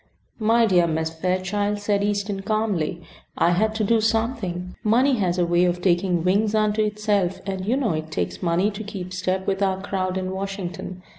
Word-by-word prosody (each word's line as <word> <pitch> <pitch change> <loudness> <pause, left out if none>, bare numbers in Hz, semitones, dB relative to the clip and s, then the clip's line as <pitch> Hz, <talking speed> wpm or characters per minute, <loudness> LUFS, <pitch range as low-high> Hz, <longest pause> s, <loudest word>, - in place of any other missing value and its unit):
"My 230 +1 +4
dear 180 -5 +4
Miss 160 0 -1
Fairchild," 185 +5 -1
said 205 -1 0
Easton, 205 -1 -1
calmly, 195 -6 -1 0.3
"I 170 - +3
had 215 +5 +1
to 220 - 0
do 225 +2 +3
something. 220 -5 -1
Money 250 +5 +3
has 185 -4 0
a 175 - +2
way 175 +1 +3
of 175 0 0
taking 175 -1 +1
wings 205 +4 +2
unto 215 0 +2
itself, 205 -3 0
and 190 -1 -4
you 245 +4 +2
know 250 -8 +1
it 155 0 -4
takes 155 - -3
money 180 +3 +1
to 210 +2 -6
keep 190 -3 -7
step 185 0 -1
with 195 0 -1
our 190 -1 +1
crowd 190 -1 -2
in 185 0 -3
Washington. 190 -2 -5
195 Hz, 190 wpm, -23 LUFS, 180-210 Hz, 0.3 s, My